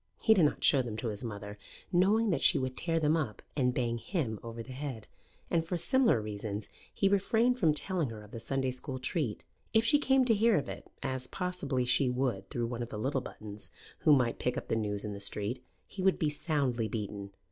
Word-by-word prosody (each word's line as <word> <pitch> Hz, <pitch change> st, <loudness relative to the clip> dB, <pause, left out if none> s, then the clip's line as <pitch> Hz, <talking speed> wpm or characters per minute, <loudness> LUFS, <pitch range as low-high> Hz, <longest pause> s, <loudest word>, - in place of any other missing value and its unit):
He 220 Hz, -, +5 dB
did 185 Hz, -7 st, +5 dB
not 145 Hz, -, 0 dB
show 135 Hz, -, +6 dB
them 115 Hz, -4 st, -5 dB
to 115 Hz, +1 st, -2 dB
his 105 Hz, +1 st, -5 dB
mother, 105 Hz, -2 st, -6 dB, 0.3 s
knowing 205 Hz, +5 st, +3 dB
that -, -, 0 dB
she -, -, +6 dB
would 130 Hz, -1 st, -2 dB
tear 165 Hz, +2 st, 0 dB
them 155 Hz, 0 st, +3 dB
up 120 Hz, -11 st, -2 dB
and 125 Hz, -4 st, +2 dB
bang 120 Hz, -2 st, -1 dB
him 120 Hz, -, -2 dB
over 115 Hz, 0 st, -6 dB
the 130 Hz, -, -11 dB
head; 130 Hz, -4 st, -5 dB, 0.5 s
and 165 Hz, -1 st, +2 dB
for 175 Hz, +2 st, -2 dB
similar 260 Hz, -, +3 dB
reasons 105 Hz, -1 st, -5 dB, 0.2 s
he 195 Hz, -, +1 dB
refrained 225 Hz, +5 st, +2 dB
from 155 Hz, -7 st, +4 dB
telling 175 Hz, -4 st, -1 dB
her 110 Hz, -2 st, -8 dB
of 105 Hz, -, -15 dB
the 115 Hz, -, -6 dB
Sunday 130 Hz, +3 st, -1 dB
school 130 Hz, +1 st, -5 dB
treat. 130 Hz, -, -2 dB, 0.3 s
If 225 Hz, +1 st, +5 dB
she 290 Hz, +5 st, +5 dB
came 265 Hz, -2 st, +4 dB
to 235 Hz, -, +4 dB
hear 220 Hz, 0 st, +4 dB
of 140 Hz, -, -2 dB
it, -, -, -8 dB
as 130 Hz, -1 st, -2 dB
possibly 145 Hz, -9 st, -2 dB
she 125 Hz, +1 st, +4 dB
would 125 Hz, -6 st, -1 dB
through 120 Hz, -1 st, -1 dB
one 120 Hz, 0 st, -4 dB
of 120 Hz, -, -4 dB
the 110 Hz, -, -5 dB
little 135 Hz, +5 st, 0 dB
Buttons, 105 Hz, -4 st, -6 dB, 0.3 s
who -, -, +4 dB
might 125 Hz, -5 st, +3 dB
pick 125 Hz, -, -1 dB
up -, -, -5 dB
the -, -, +2 dB
news 105 Hz, -2 st, -2 dB
in 105 Hz, -, -4 dB
the 100 Hz, -, -7 dB
street, 105 Hz, +5 st, -2 dB, 0.2 s
he 195 Hz, -, -7 dB
would 190 Hz, 0 st, +3 dB
be 150 Hz, -2 st, +1 dB
soundly 140 Hz, -7 st, 0 dB
beaten. 100 Hz, -2 st, -4 dB
130 Hz, 225 wpm, -31 LUFS, 110-170 Hz, 0.5 s, show